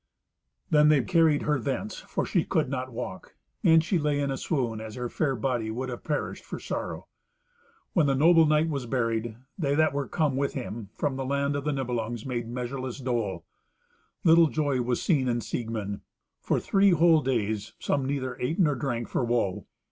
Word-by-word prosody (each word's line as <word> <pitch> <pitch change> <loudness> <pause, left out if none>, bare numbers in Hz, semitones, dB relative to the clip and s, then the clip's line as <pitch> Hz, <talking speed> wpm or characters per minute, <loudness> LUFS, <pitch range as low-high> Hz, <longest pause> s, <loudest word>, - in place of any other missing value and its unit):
Then 150 0 +6
they 145 -4 +4
carried 160 -2 +3
her 150 -2 +1
thence, 120 -3 -3
for - - -3
she - - +1
could - - 0
not 130 -1 -3
walk. 115 -5 -7 0.3
And 160 -1 +6
she 175 +1 +1
lay 150 -1 0
in 140 -1 0
a - - -1
swoon, 125 -7 -2
as 110 -1 -7
her 125 -1 -3
fair 140 0 0
body 120 -2 -1
would 130 +4 -3
have 120 - -6
perished 150 -1 -3
for - - -6
sorrow. - - -4 0.9
When 165 -6 +3
the 135 - +2
noble 165 +3 +6
knight 155 +1 +3
was 140 -6 -3
buried, 115 -2 -1 0.2
they 140 -4 +1
that 155 -1 +3
were 140 -1 -2
come 150 -5 0
with 140 +1 -1
him 115 -5 -5
from 140 -3 -1
the 135 - -2
land 140 +1 0
of 145 0 -3
the 150 - +1
Nibelungs 120 -4 -3
made 120 -3 -3
measureless 125 +1 -4
dole. 115 -9 -2 0.8
Little 165 0 +6
joy 145 -4 0
was 120 0 0
seen 140 -8 +1
in 120 -1 +1
Siegmund. 110 -3 -4 0.4
For - - +1
three 200 0 +3
whole 165 -1 +5
days 110 -5 -1
some 140 -2 -1
neither 130 -3 -2
ate 130 +7 -1
nor 155 -6 +3
drank 120 -3 -3
for - - -1
woe. 115 -6 -1
130 Hz, 190 wpm, -27 LUFS, 120-150 Hz, 0.9 s, Then